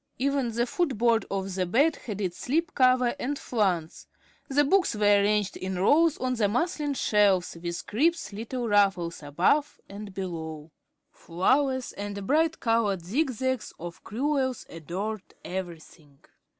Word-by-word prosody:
Even 275 -2 0
the 235 +2 0
foot 285 -2 -1
board 230 0 +2
of 195 -1 -3
the 185 -1 -1
bed 285 - +3
had 210 -4 -7
its 180 -3 -3
slip 320 +5 -1
cover 255 -2 +3
and 285 +3 -2
flounce. 185 -11 -1 0.4
The 285 +2 +3
books 360 - +2
were 205 -1 +4
ranged 205 -1 +1
in 185 0 -4
rows 300 - +4
on 255 0 -1
the 220 -4 +1
muslin 295 - -1
shelves 200 -7 +2
with 170 0 -4
crisp 315 +4 0
little 235 +3 -4
ruffles 195 -6 +2
above 175 - +1
and 205 0 -8
below. 160 -5 -6 0.4
Flowers 260 +9 0
and 200 -1 -6
bright 315 +6 +2
colored 220 -7 +1
zig 270 - 0
zags 260 0 -2
of 175 +1 -8
crewels 260 +2 -1
adorned 190 +6 -5
everything. 170 -5 -7
215 Hz, 145 wpm, -27 LUFS, 185-265 Hz, 0.4 s, were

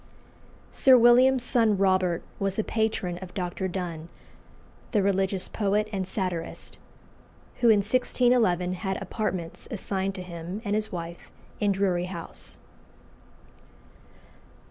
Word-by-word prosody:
Sir 260 -1 +6
William's 245 +2 +6
son 225 -4 +2
Robert 185 -3 +2 0.2
was 195 -1 -1
a 220 - +1
patron 215 -6 -1
of 185 -1 -10
Dr. 185 0 -2
Donne, 170 -3 -5 0.8
the 205 -3 +3
religious 195 -1 +1
poet 210 0 0
and 190 -2 -2
satirist, 185 -4 -4 0.8
who 240 - +5
in 210 -2 +6
1611 225 -5 +2
had 190 -2 -2
apartments 190 -4 -4
assigned 195 -4 -2
to 185 - -5
him 175 +2 -6
and 205 - -1
his 215 0 -2
wife 170 -2 -7 0.3
in 205 -1 +2
Drury 185 -3 +1
House. 175 -3 -7
195 Hz, 120 wpm, -27 LUFS, 180-215 Hz, 0.8 s, Sir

